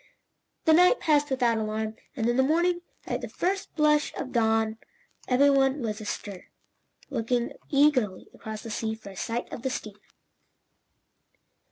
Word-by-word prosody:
The 320 - +6
night 360 +9 +6
passed 295 -1 +2
without 245 -4 +2
alarm, 215 0 -2 0.2
and 230 -4 0
in 240 - +2
the 265 - +4
morning, 345 +5 +2 0.2
at - - -3
the - - -6
first 380 +2 -2
blush 300 -1 +3
of 255 - -5
dawn, 225 -2 +1 0.5
every 280 +3 +5
one 270 0 +2
was 215 -1 -3
astir, 205 -2 -6 0.6
looking 240 -1 0 0.2
eagerly 275 -9 +2
across 215 -1 -7
the 225 - -6
sea 220 +1 -2
for 220 -2 -12
a - - -13
sight 230 +4 -3
of - - -6
the 265 - -1
steamer. 210 -5 -6
245 Hz, 155 wpm, -27 LUFS, 220-290 Hz, 0.6 s, The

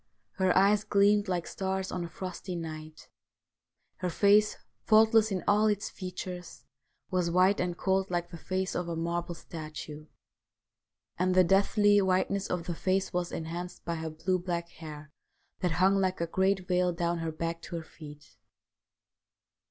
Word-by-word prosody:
Her 185 -2 +3
eyes 200 +2 +4
gleamed 205 +1 +3
like 180 -2 -1
stars 190 0 -3
on 180 - -3
a 170 - -6
frosty 185 +1 -6
night; 155 -2 -7 0.9
her 180 - -2
face, 205 +4 +4 0.3
faultless 220 0 +5
in 185 -2 -2
all 210 +1 +4
its 205 -1 -1
features, 180 -1 -7 0.5
was 180 -2 +1
white 185 +3 +3
and 175 -1 -1
cold 190 0 +1
like 175 -1 -2
the 170 - -7
face 185 +2 -2
of 180 - -2
a 170 - -3
marble 170 +1 -2
statue; 155 -2 -8 1.1
and 185 0 +2
the 185 - +7
deathly 205 +3 +4
whiteness 190 +1 +1
of 175 -2 -2
the 175 - -2
face 190 +3 0
was 175 0 -1
enhanced 170 +2 -6
by 170 - -1
her 160 -1 -4
blue 170 +4 -1
black 170 -1 -3
hair 155 -2 -10 0.5
that 180 -3 0
hung 190 +3 +3
like 185 -1 0
a 170 - 0
great 190 +2 +1
veil 180 -1 +2
down 170 0 -1
her 165 -1 -2
back 165 +1 -4
to - - -7
her 165 - -4
feet. 150 -2 -13
180 Hz, 160 wpm, -29 LUFS, 170-190 Hz, 1.1 s, the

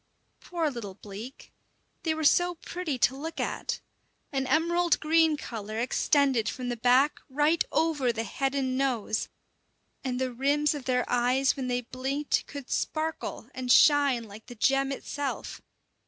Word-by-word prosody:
Poor 330 -4 -2
little 210 -7 -7
bleak! 210 +7 -10 0.5
they 320 -1 0
were 315 - -3
so 350 +4 +4
pretty 335 -4 -4
to 250 +1 +3
look 320 +4 -6
at. - - -2 0.5
An 270 -1 -1
emerald 340 +2 +2
green 320 0 +3
colour 215 -5 -6
extended 255 -1 +2
from 250 -1 -4
the 240 - -1
back 250 +5 +3
right 295 +4 +2
over 310 -6 +2
the 225 -1 -3
head 270 +4 -2
and 260 -2 0
nose; 250 -5 -1 0.7
and 255 -2 -2
the 260 -1 -1
rims 285 +4 +2
of 285 -4 -6
their 250 -1 +1
eyes 250 +2 +2
when 265 -2 -4
they 245 0 0
blinked 265 +4 -2
could 280 -3 -8
sparkle 315 +1 -2
and 255 -1 -2
shine 280 -5 +5
like 215 +1 -12
the 245 - -9
gem 270 +4 +2
itself. 280 +1 -4
270 Hz, 155 wpm, -28 LUFS, 245-300 Hz, 0.7 s, shine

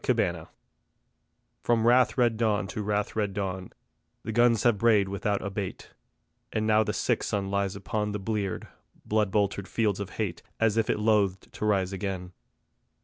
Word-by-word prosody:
The - - +2 0.2
Lark - - -10 1.1
From 115 -1 +2
wrath 125 +2 +4
red 120 -3 +3
dawn 110 -3 +1
to 105 - -4
wrath 105 0 -1
red 105 -3 -1
dawn, 95 -2 -3 0.5
The - - -4
guns 120 -1 +3
have 120 -4 +3
brayed 110 -3 +4
without 100 +1 -1
abate; 100 -1 -5 0.6
And 110 0 -1
now 110 0 +4
the - - -2
sick - - 0
sun 100 -1 -2
looks 100 -1 0
upon 105 +1 -2
The 105 - -2
bleared, 100 -2 -3 0.4
blood 105 -1 +1
boltered 100 -1 0
fields 105 -4 0
of 100 -2 -4
hate 100 -7 -2 0.2
As 115 -2 +3
if 115 -1 +1
it - - +2
loathed 105 -3 +1
to - - -4
rise 100 -3 +1
again. 95 -2 -4
105 Hz, 170 wpm, -28 LUFS, 100-110 Hz, 1.1 s, wrath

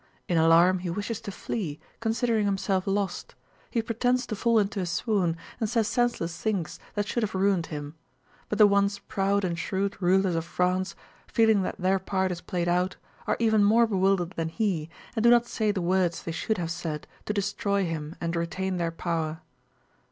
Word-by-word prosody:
In 175 - 0
alarm 165 +3 +5
he 180 0 -4
wishes 205 +5 -3
to 200 - -6
flee, 180 -6 -4 0.2
considering 225 -1 +1
himself 195 -1 0
lost. 195 -2 -2 0.3
He 230 -3 0
pretends 245 +2 +1
to 215 - -4
fall 230 +3 +2
into 205 -1 +1
a 185 - -1
swoon 175 -1 0 0.2
and 220 -3 0
says 225 -2 +1
senseless 230 -8 0
things 195 -8 -2 0.2
that 205 0 -1
should 240 - -1
have 215 -2 -2
ruined 190 -3 +2
him. 145 -1 -6 0.6
But 210 - -1
the 210 - +8
once 200 0 +3
proud 200 0 0
and 170 -2 -2
shrewd 195 +3 -2
rulers 185 +1 +3
of 165 -1 0
France, 180 +2 0 0.3
feeling 220 -3 +4
that 185 - -3
their 190 0 +2
part 190 0 -1
is 175 -1 -5
played 175 -1 -2
out, 180 +2 +1 0.3
are - - +1
even 220 -2 +4
more 225 +3 +5
bewildered 190 -4 +1
than 165 -3 -3
he, 170 -5 -1 0.3
and 220 - 0
do 235 - +6
not 240 0 +6
say 220 -2 -1
the 195 -3 -2
words 180 -1 +1
they 165 - -4
should 210 +6 -1
have 170 -2 -2
said 165 -3 -4 0.2
to - - -1
destroy 200 -1 0
him 160 -1 -4
and 170 0 -2
retain 180 +3 -2
their 170 -1 0
power. 165 -1 -3
190 Hz, 190 wpm, -27 LUFS, 170-210 Hz, 0.6 s, the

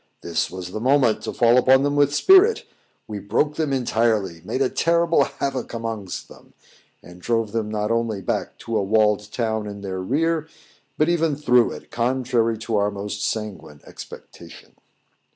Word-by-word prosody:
This 85 - -1
was 90 -1 -7
the 110 - -4
moment 130 -1 +2
to - - -4
fall 120 +1 +4
upon 130 +2 +4
them 145 0 0
with 145 -1 +3
spirit; 385 - +5 0.4
we 105 -2 -5
broke 115 +10 0
them 155 -3 -1
entirely 110 -9 0
made 135 - -1
a - - +2
terrible 170 +3 +2
havoc 130 -3 -4
amongst 110 -5 -5
them, - - -17 0.5
and 90 +1 -14
drove 115 0 -1
them 110 -1 -2
not 105 0 -2
only 115 -3 -1
back 95 - -3
to 115 -1 -1
a - - 0
walled 105 0 +1
town 110 -3 -2
in 100 -1 -8
their 95 -2 -4
rear, 160 - 0 0.5
but 155 - +2
even 165 -3 +1
through 125 -5 +3
it, - - -12
contrary 120 -2 0
to 110 0 -2
our 100 0 +2
most 100 0 -5
sanguine 105 -9 -4
expectation. - - -12
115 Hz, 170 wpm, -22 LUFS, 105-135 Hz, 0.5 s, spirit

